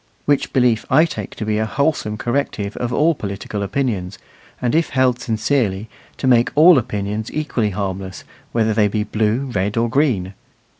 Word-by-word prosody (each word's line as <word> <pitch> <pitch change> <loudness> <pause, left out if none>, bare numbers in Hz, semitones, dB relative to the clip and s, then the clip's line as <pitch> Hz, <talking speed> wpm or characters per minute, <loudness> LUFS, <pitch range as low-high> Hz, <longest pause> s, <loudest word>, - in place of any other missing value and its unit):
Which 145 -1 +1
belief 125 -4 +2
I 155 +5 +5
take 110 - -6
to 110 - -5
be 105 0 0
a 110 - 0
wholesome 140 -4 -1
corrective 120 -5 -2
of 120 -1 -2
all 155 +6 +3
political 100 -4 -5
opinions, 100 -4 -2 0.4
and, 125 +1 -1
if 165 +1 +2
held 130 -2 +2
sincerely, 110 -3 -1 0.3
to - - -4
make 120 -2 +4
all 160 0 +7
opinions 105 0 -4
equally 140 -8 -1
harmless, 95 -2 -4 0.3
whether 110 -2 +1
they 105 -1 +3
be 105 +1 -1
blue, 110 +5 -1
red, 100 +3 -1
or 115 +1 +2
green. 115 -10 +1
110 Hz, 165 wpm, -19 LUFS, 105-130 Hz, 0.4 s, all